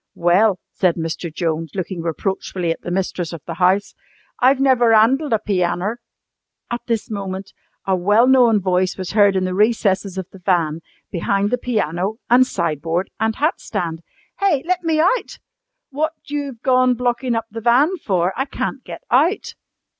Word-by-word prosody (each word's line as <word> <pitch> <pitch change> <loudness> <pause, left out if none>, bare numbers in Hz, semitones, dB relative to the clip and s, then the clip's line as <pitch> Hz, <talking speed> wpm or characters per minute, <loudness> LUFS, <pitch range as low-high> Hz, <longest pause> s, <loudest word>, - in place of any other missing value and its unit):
"Well," 185 +4 +3
said 180 -3 +1
Mr. 165 0 -4
Jones, 160 -1 -3
looking 185 -2 -4
reproachfully 175 +1 -2
at - - -4
the - - -6
mistress 180 -2 -2
of 165 - -8
the 170 - -5
house, 185 +3 +1 0.5
"I've 260 +2 +4
never 245 -4 +4
'andled 265 +7 +3
a 225 - +4
pianner 195 +1 -1 0.4
" - - -31
At 240 - -3
this 225 -2 -2
moment 195 -1 -5 0.3
a 190 - +2
well 205 +6 +3
known 245 -4 +5
voice 185 -1 0
was 185 -2 -5
heard 205 -2 +4
in 190 - +1
the 185 - -2
recesses 200 -2 +1
of 190 - -3
the 195 - -13
van, 170 -4 0 0.3
behind 200 +4 0
the 250 - 0
piano 205 -4 -1 0.2
and 255 +1 +6
sideboard 170 - -2
and 220 0 0
hat 305 +4 0
stand. 170 -6 -4 0.4
"Hey! 365 -9 +2
let 365 +1 0
me 325 -2 0
out! 375 +10 +1 0.5
What 310 +3 -1
you've 285 -5 -5
gone 255 -1 +3
blockin' 245 0 -1
up 225 -1 -2
the 225 +1 -6
van 265 - +3
for? 185 - 0
I 265 - -1
can't 270 -1 -4
get - - -9
out!" 310 - +2
205 Hz, 170 wpm, -20 LUFS, 180-250 Hz, 0.5 s, and